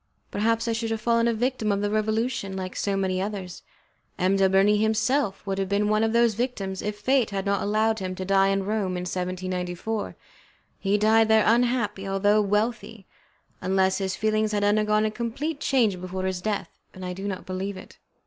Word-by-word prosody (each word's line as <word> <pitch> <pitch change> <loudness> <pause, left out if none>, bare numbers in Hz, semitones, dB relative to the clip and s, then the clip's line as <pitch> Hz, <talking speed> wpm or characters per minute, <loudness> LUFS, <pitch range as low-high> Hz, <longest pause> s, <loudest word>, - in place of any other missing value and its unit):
Perhaps 230 +2 0
I 230 - +1
should 225 0 -2
have 225 0 -2
fallen 230 +1 +2
a 235 - +2
victim 240 -2 0
of 200 0 0
the 205 0 -1
Revolution, 215 -1 -1
like 185 -1 -5
so 200 -1 -1
many 185 -1 0
others. 195 -3 -5 0.6
M. 185 +1 +2
de 195 -1 +3
Bernis 200 +2 +4
himself 220 0 +1
would 195 -1 -2
have 195 -1 -1
been 205 +1 +1
one 215 +1 +2
of 225 - +1
those 235 -1 +3
victims 200 -5 -3
if 210 0 -3
Fate 255 +2 +2
had 195 -1 -3
not 200 0 +1
allowed 220 +2 +1
him 185 -1 -4
to 185 - -5
die 195 0 +4
in 195 0 +1
Rome 200 -3 -1
in - - -3
1794. 185 +3 -3 0.6
He 200 +1 +1
died 220 +1 +4
there 220 -1 +4
unhappy, 230 -4 +1
although 205 +2 +3
wealthy, 210 0 -1 0.6
unless 190 0 +1
his 190 -1 -2
feelings 215 0 0
had 205 -1 0
undergone 210 +1 +2
a 215 - 0
complete 255 +7 -3
change 220 -11 +1
before 185 +1 -4
his 185 -1 -2
death, 210 0 -3 0.2
and 185 0 -7
I 180 - -3
do 195 +2 -5
not 190 -2 -5
believe 190 +1 -4
it. - - -13
205 Hz, 195 wpm, -25 LUFS, 190-220 Hz, 0.6 s, Bernis